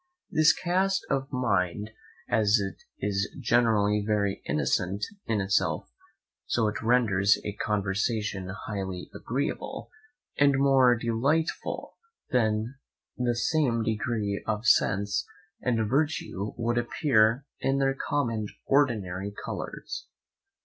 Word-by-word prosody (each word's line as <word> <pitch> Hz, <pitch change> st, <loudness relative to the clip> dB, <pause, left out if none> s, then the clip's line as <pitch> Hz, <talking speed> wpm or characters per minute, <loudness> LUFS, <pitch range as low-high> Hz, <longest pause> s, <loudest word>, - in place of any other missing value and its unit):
This 155 Hz, 0 st, +6 dB
cast 185 Hz, +4 st, 0 dB
of 135 Hz, 0 st, -1 dB
mind, 105 Hz, -5 st, 0 dB, 0.4 s
as 110 Hz, -1 st, +3 dB
it 95 Hz, -1 st, -5 dB, 0.2 s
is 100 Hz, 0 st, 0 dB
generally 110 Hz, -4 st, +3 dB
very 100 Hz, -2 st, 0 dB
innocent 90 Hz, +8 st, 0 dB, 0.2 s
in 110 Hz, -2 st, +1 dB
itself, 95 Hz, -9 st, 0 dB, 0.6 s
so 115 Hz, -2 st, +1 dB
it 105 Hz, -, -3 dB
renders 105 Hz, -4 st, +3 dB
his 105 Hz, -, -3 dB
conversation 100 Hz, -1 st, -1 dB, 0.2 s
highly 95 Hz, -4 st, -5 dB
agreeable, 140 Hz, -, -4 dB, 0.5 s
and 140 Hz, -1 st, +5 dB
more 135 Hz, -3 st, +5 dB
delightful 125 Hz, +8 st, -1 dB, 0.3 s
than 115 Hz, +2 st, 0 dB, 0.4 s
the 120 Hz, -1 st, 0 dB
same 125 Hz, -3 st, +1 dB
degree 110 Hz, -2 st, -1 dB
of 110 Hz, +1 st, -1 dB
sense 100 Hz, -4 st, +2 dB, 0.3 s
and 115 Hz, -3 st, +1 dB
virtue 135 Hz, -7 st, -1 dB
would 120 Hz, +1 st, +1 dB
appear 120 Hz, 0 st, +2 dB
in 135 Hz, 0 st, +1 dB
their 135 Hz, 0 st, +2 dB
common 135 Hz, -4 st, -1 dB
and 105 Hz, -1 st, -5 dB
ordinary 100 Hz, -9 st, +1 dB
colours. -, -, -6 dB
115 Hz, 110 wpm, -28 LUFS, 100-135 Hz, 0.6 s, This